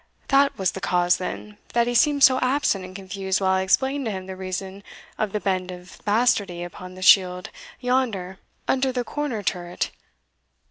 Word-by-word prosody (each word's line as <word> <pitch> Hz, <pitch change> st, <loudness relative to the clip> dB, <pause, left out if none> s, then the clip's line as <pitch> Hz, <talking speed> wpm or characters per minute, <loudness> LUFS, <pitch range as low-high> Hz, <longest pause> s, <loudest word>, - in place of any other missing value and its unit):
that 275 Hz, 0 st, +4 dB
was 190 Hz, -3 st, +1 dB
the 190 Hz, -, -7 dB
cause, 175 Hz, 0 st, +2 dB
then, 210 Hz, +3 st, -6 dB
that 235 Hz, 0 st, +3 dB
he 245 Hz, -, -1 dB
seemed 285 Hz, +3 st, +3 dB
so 260 Hz, -1 st, +7 dB
absent 255 Hz, -7 st, +1 dB
and 185 Hz, 0 st, -10 dB
confused 190 Hz, 0 st, -2 dB
while 190 Hz, -1 st, +2 dB
I 190 Hz, 0 st, +2 dB
explained 265 Hz, +8 st, +1 dB
to 220 Hz, -, -1 dB
him 190 Hz, -2 st, -5 dB
the 190 Hz, 0 st, -7 dB
reason 190 Hz, +1 st, -5 dB, 0.4 s
of 215 Hz, -2 st, 0 dB
the 210 Hz, -, -1 dB
bend 185 Hz, -2 st, -1 dB
of 180 Hz, 0 st, -10 dB
bastardy 205 Hz, -5 st, +1 dB
upon 180 Hz, +1 st, -9 dB
the 185 Hz, -, -7 dB
shield 180 Hz, -2 st, +5 dB, 0.3 s
yonder 230 Hz, -8 st, -1 dB, 0.3 s
under 265 Hz, 0 st, +1 dB
the 250 Hz, -1 st, -2 dB
corner 255 Hz, -5 st, -3 dB
turret!" 175 Hz, -2 st, -2 dB
195 Hz, 180 wpm, -24 LUFS, 185-245 Hz, 0.4 s, so